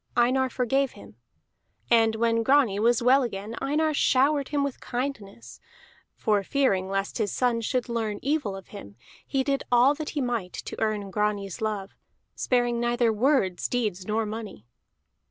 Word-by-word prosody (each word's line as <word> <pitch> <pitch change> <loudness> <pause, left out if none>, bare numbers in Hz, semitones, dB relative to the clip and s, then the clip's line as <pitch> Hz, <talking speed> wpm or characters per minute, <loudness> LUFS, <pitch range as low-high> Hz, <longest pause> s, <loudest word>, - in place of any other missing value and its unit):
Einar 255 +2 +3
forgave 265 +2 0
him. 100 +1 -14 0.7
And 225 -1 +4
when 230 0 +1
Grani 245 -5 +3
was 235 +2 +2
well 260 +3 +5
again 210 -3 -4
Einar 310 +2 +1
showered 280 0 +2
him 290 -1 0
with 280 -2 -4
kindnesses, 205 - -5 0.6
for 210 -2 +1
fearing 195 -5 0
lest 195 +2 -2
his 205 -3 0
son 245 -2 +1
should 250 +2 -1
learn 225 -3 -2
evil 280 -8 -1
of 195 - -11
him 100 - -10 0.3
he 270 -1 0
did 275 0 0
all 245 +3 +5
that 300 +1 -5
he - - +2
might 235 -8 -2
to - - -6
earn 210 -3 -1
Grani's 205 -2 -2
love, 210 -3 -3 0.4
sparing 240 -2 0
neither 240 -1 +1
words, 215 -6 +1
deeds, 210 -7 -2
nor 220 +1 0
money. 215 - -7
230 Hz, 155 wpm, -26 LUFS, 205-260 Hz, 0.7 s, well